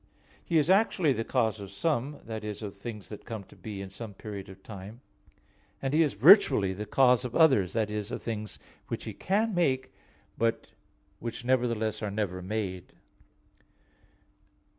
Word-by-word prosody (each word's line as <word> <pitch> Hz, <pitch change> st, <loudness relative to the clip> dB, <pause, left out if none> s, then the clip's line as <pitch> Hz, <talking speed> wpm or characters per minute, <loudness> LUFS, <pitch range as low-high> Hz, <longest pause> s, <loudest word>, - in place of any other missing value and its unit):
He 170 Hz, -, +1 dB
is 155 Hz, +3 st, +3 dB
actually 190 Hz, -7 st, +3 dB
the 115 Hz, -, -2 dB
cause 110 Hz, -2 st, 0 dB
of 100 Hz, -1 st, -7 dB
some, 145 Hz, -, -1 dB
that 110 Hz, -1 st, -5 dB
is, 105 Hz, 0 st, -5 dB
of 100 Hz, -1 st, -6 dB
things 105 Hz, 0 st, -8 dB
that 105 Hz, -, -9 dB
come 110 Hz, -3 st, -6 dB
to -, -, -18 dB
be 105 Hz, -3 st, -7 dB
in 95 Hz, -1 st, -7 dB
some 105 Hz, 0 st, -8 dB
period 100 Hz, -2 st, -7 dB
of 95 Hz, 0 st, -13 dB
time; 105 Hz, +3 st, -9 dB, 0.8 s
and 135 Hz, 0 st, -2 dB
He 155 Hz, -, +5 dB
is 150 Hz, -3 st, +2 dB
virtually 110 Hz, -, +6 dB
the 105 Hz, +3 st, -6 dB
cause 125 Hz, +2 st, +4 dB
of 125 Hz, -2 st, -5 dB
others, 130 Hz, -, +5 dB
that 110 Hz, -2 st, 0 dB
is, 105 Hz, -1 st, -3 dB
of -, -, -5 dB
things 110 Hz, -2 st, -4 dB, 0.3 s
which -, -, -4 dB
He -, -, -6 dB
can 210 Hz, +3 st, 0 dB
make, 130 Hz, -7 st, +1 dB, 0.5 s
and 115 Hz, 0 st, +3 dB, 0.6 s
which 120 Hz, +1 st, -5 dB
nevertheless 120 Hz, -4 st, +1 dB
are 105 Hz, -, -2 dB
never 100 Hz, -3 st, -2 dB
made. 95 Hz, -2 st, -4 dB
110 Hz, 170 wpm, -29 LUFS, 100-130 Hz, 0.8 s, virtually